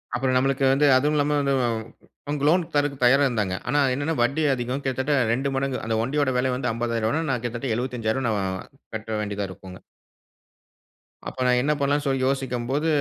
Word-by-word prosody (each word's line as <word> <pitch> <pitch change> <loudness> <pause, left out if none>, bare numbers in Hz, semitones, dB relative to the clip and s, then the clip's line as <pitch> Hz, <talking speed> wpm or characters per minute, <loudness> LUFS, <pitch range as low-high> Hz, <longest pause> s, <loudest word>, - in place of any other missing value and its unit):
அப்புறம் 130 0 0
நம்மளுக்கு 135 +1 +1
வந்து 145 +2 +3
அதுவும் 145 +3 +1
இல்லாம 150 0 +1
வந்து 140 -1 +1
அவங்க. 120 +5 -6
லோன் 175 +3 +4
தர்றதுக்கு 145 -3 0
தயாரா 135 +3 +5
இருந்தாங்க. 105 -7 -1
ஆனா 145 - +2
என்னன்னா, 145 +5 -1
வட்டி 140 +6 +1
அதிகம் 125 +2 -3
கிட்டத்தட்ட. 130 +2 0 0.2
2 135 +3 -1
மடங்கு, 135 -1 -1
அந்த 115 0 0
வண்டியோட 135 +3 0
வெல 125 0 +1
வந்து 125 - -1
ரூ.50,000ன்னா, 115 +5 -1
நான் 125 -3 -1
கிட்டத்தட்ட 120 +1 -2
ரூ.75,000 120 0 -1 0.7
கட்ட 110 0 -6
வேண்டியதா 100 -1 -3
இருக்குங்க. 95 0 -11 1.5
அப்ப - - -13
நான் 125 0 +3
என்ன 150 - +1
பண்ணலான்னு 145 +1 +1
சொல்லி 135 -1 0
யோசிக்கும் 130 -3 -2
போது, 150 +4 0
130 Hz, 165 wpm, -24 LUFS, 120-140 Hz, 1.5 s, தயாரா